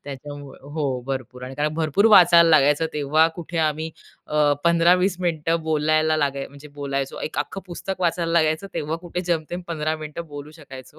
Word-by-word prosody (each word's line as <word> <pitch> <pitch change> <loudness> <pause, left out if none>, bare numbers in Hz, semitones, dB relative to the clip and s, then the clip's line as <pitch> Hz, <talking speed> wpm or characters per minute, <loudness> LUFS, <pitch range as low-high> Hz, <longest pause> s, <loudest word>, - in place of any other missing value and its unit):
त्याच्यामुळे 145 0 -9
हो, 140 -3 -3
भरपूर 130 -2 -5
आणि 140 +4 -2
भरपूर 165 +6 +2
वाचायला 170 -4 +7
लागायचं, 150 0 +4
तेव्हा 150 +2 +3
कुठे 170 -1 -5
आम्ही 155 0 0 0.4
अं, 150 -1 +2
15-20 175 +2 +3
मिनिटं 165 -1 0
बोलायला 155 0 +1
लागाय 140 -2 -1
म्हणजे 145 +1 -14
बोलायचो, 140 -1 -4
एक - - -4
अख्खं 170 +6 -3
पुस्तक 185 +2 -6
वाचायला 170 -1 0
लागायचं, 160 +1 +1
तेव्हा 155 +2 -2
कुठे 175 +1 -5
जेमतेम 175 0 -2
15 155 -1 -2
मिनिटं 155 +2 -7
बोलू 145 0 -9
शकायचो. 135 +1 -12
155 Hz, 160 wpm, -23 LUFS, 145-170 Hz, 0.4 s, वाचायला